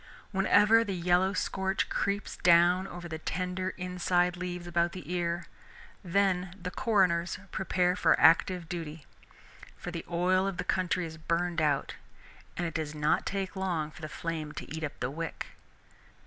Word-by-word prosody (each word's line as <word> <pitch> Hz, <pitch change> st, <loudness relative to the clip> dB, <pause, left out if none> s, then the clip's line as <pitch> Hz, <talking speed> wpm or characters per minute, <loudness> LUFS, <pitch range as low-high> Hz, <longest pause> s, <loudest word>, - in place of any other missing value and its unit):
Whenever 210 Hz, +3 st, +5 dB
the 200 Hz, -4 st, -3 dB
yellow 180 Hz, +2 st, +2 dB
scorch 190 Hz, -1 st, -1 dB
creeps 200 Hz, +1 st, -2 dB
down 175 Hz, +2 st, +5 dB
over 175 Hz, -1 st, -8 dB
the 160 Hz, -1 st, -5 dB
tender 185 Hz, +3 st, -2 dB
inside 180 Hz, -1 st, +1 dB
leaves 180 Hz, -1 st, -5 dB
about 175 Hz, 0 st, 0 dB
the 180 Hz, -1 st, -6 dB
ear, 175 Hz, 0 st, -1 dB, 0.6 s
then 185 Hz, 0 st, +1 dB
the 180 Hz, 0 st, -5 dB
coroners 185 Hz, -9 st, +2 dB
prepare 180 Hz, -1 st, +1 dB
for -, -, +3 dB
active 170 Hz, +1 st, +4 dB
duty; 160 Hz, -3 st, -6 dB, 0.7 s
for 180 Hz, -, -6 dB
the 170 Hz, -1 st, -5 dB
oil 185 Hz, +2 st, +2 dB
of 195 Hz, -2 st, -3 dB
the -, -, -2 dB
country 180 Hz, -1 st, 0 dB
is 160 Hz, -1 st, -8 dB
burned 170 Hz, +1 st, 0 dB
out 145 Hz, -3 st, 0 dB, 0.6 s
and 175 Hz, -, -1 dB
it 165 Hz, -, -3 dB
does 155 Hz, -2 st, -3 dB
not 150 Hz, 0 st, +1 dB
take 195 Hz, -1 st, -3 dB
long 175 Hz, -5 st, -2 dB
for 155 Hz, -, -14 dB
the 155 Hz, -, -5 dB
flame 160 Hz, -3 st, -4 dB
to -, -, -7 dB
eat 160 Hz, -, -5 dB
up 145 Hz, -2 st, -5 dB
the 125 Hz, +1 st, -1 dB
wick. 165 Hz, +3 st, -5 dB
175 Hz, 160 wpm, -30 LUFS, 165-185 Hz, 0.7 s, Whenever